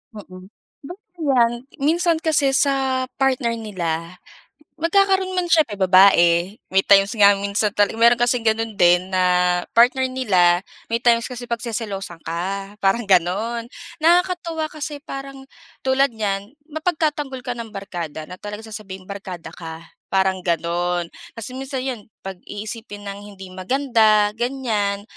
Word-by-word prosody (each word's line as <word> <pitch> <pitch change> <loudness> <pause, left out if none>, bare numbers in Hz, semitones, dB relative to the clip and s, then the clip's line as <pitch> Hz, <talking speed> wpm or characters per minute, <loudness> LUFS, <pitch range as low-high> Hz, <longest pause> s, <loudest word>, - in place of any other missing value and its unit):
Mm. 185 -3 -11 0.4
Ba 350 - -6 0.3
'yan 260 -7 +3 0.3
minsan 335 +3 +2
kasi 285 -4 +2
sa 270 -2 +1 0.2
partner 255 -3 +1
nila, 170 -5 -4 0.6
magkakaroon 380 +2 +2
man 360 -1 0
siyempre 310 -11 +3
babae 185 -1 +5 0.2
may 190 +1 +3
times 195 +1 +5
nga 200 -2 +6
minsan 200 +1 0
tal 205 -1 +3
mayroon 235 +1 +6
kasing 240 -1 +1
gano'n 220 0 0
din 175 +2 +4
na 185 0 +3 0.5
partner 255 +3 +4
nila. 185 -9 +3 0.3
May 230 - +1
times 235 -1 +3
kasi 245 -1 -7
pagseselosan 220 -7 -4
ka, 195 +4 -4
parang 195 +5 +2
gano'n. 205 +6 +1 0.4
Nakakatuwa 340 -2 +2
kasi 295 -1 -6
parang 275 -1 -8 0.4
tulad 265 0 +3
niyan 205 0 -3 0.2
mapagtatanggol 305 -4 -2
ka 245 - -2
ng 230 -2 -7
barkada 175 -6 -6
na 180 - -7
talagang 210 +2 -8
sasabihing 195 -3 -9
barkada 185 -4 -7
ka, 160 -1 -8 0.3
parang 190 -1 +2
gano'n. 175 0 -1 0.3
Kasi 230 +2 -6
minsan 265 -1 -4
'yon 250 -5 -3 0.2
pag-iisipin 205 +3 -8
ng 200 0 -6 0.2
hindi 190 -1 -10
maganda 215 0 +2
ganyan. 225 -5 -1
220 Hz, 130 wpm, -21 LUFS, 190-265 Hz, 0.6 s, nga